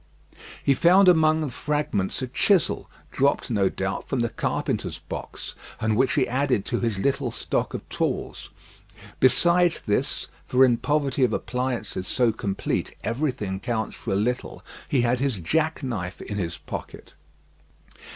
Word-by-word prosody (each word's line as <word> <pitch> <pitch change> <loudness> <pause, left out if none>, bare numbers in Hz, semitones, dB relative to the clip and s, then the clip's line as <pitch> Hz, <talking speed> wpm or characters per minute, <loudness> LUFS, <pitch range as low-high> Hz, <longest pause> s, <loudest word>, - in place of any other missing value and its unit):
He 140 - +4
found 185 +7 +5
among 160 -2 +5
the 150 - -1
fragments 130 -7 -1
a - - -2
chisel, 185 +8 +2 0.2
dropped, 140 -1 +1
no 100 -4 +3
doubt, 95 0 -3
from 130 - 0
the 120 - +1
carpenter's - - -2
box, - - -7 0.3
and 110 -1 +1
which 130 +4 +3
he 135 - +2
added 130 -4 +1
to 120 - -1
his 115 -4 -1
little 135 +4 0
stock 115 - -2
of - - -7
tools. - - -3 0.7
Besides 170 +6 +4
this 105 - -1 0.2
for 130 +1 +6
in 120 -2 +3
poverty 140 0 +1
of 120 -3 +3
appliances 120 -7 -2
so 120 -2 +2
complete 100 -3 -2
everything 115 -7 -2
counts 110 -1 -2
for - - -5
a - - +2
little 120 +5 -2 0.2
he 135 - +3
had 120 +1 +2
his 135 -5 0
jack 155 - 0
knife 95 - -4
in 105 - -5
his 85 -2 -3
pocket. - - -8
125 Hz, 150 wpm, -25 LUFS, 110-140 Hz, 0.7 s, for